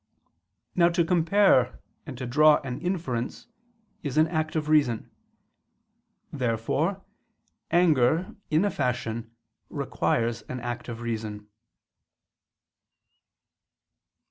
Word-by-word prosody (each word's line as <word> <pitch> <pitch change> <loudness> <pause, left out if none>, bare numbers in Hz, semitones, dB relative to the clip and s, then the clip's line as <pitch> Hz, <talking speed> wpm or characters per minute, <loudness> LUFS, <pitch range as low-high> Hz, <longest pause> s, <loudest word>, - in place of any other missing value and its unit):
Now 170 -1 +4
to 170 -1 +1
compare 170 -6 +3 0.3
and 135 -4 -7
to 125 - -5
draw 150 +4 +5
an 130 0 -5
inference 160 -10 -3 0.6
is 145 -2 -4
an 155 +1 +5
act 155 -2 -2
of 155 -1 -1
reason. 145 -7 +2 1.2
Therefore 140 - -1 0.6
anger, 165 -1 +3
in 155 +5 +3
a 205 - +1
fashion, 120 -5 -2 0.4
requires 115 -1 -1
an 125 - -4
act 120 +1 -5
of 120 0 -6
reason. 110 -3 -5
140 Hz, 95 wpm, -26 LUFS, 120-165 Hz, 1.2 s, draw